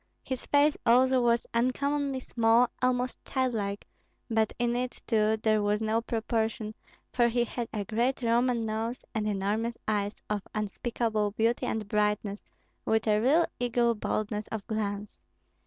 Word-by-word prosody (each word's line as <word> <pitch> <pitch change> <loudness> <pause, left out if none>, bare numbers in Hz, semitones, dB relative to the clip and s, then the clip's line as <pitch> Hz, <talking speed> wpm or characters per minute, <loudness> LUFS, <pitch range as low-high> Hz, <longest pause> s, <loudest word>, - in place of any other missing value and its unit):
His 260 -2 -5
face, 290 +1 +4
also, 255 +2 +5
was 235 -1 +2
uncommonly 275 +3 0
small, 235 0 +3
almost 250 0 0
childlike; 220 -7 -2 0.5
but 220 -1 +2
in 240 0 +1
it, 250 0 -3
too, 220 -1 +2
there 215 -1 +3
was 205 0 +1
no 220 +1 +1
proportion, 220 -1 -2 0.4
for 240 -1 +4
he 240 +1 +1
had 240 0 -4
a 205 -2 -3
great 240 +5 0
Roman 235 0 +2
nose 220 +3 -3
and 215 -1 -1
enormous 210 +3 -1
eyes 205 -1 0
of 210 -1 -1
unspeakable 215 0 -1
beauty 230 +2 +1
and 220 -2 -2
brightness, 210 -1 0 0.4
with 220 0 +1
a 210 -1 +3
real 305 +8 +4
eagle 240 -1 +2
boldness 210 -1 -2
of 220 -2 -5
glance. 205 - -3
225 Hz, 145 wpm, -29 LUFS, 215-245 Hz, 0.5 s, also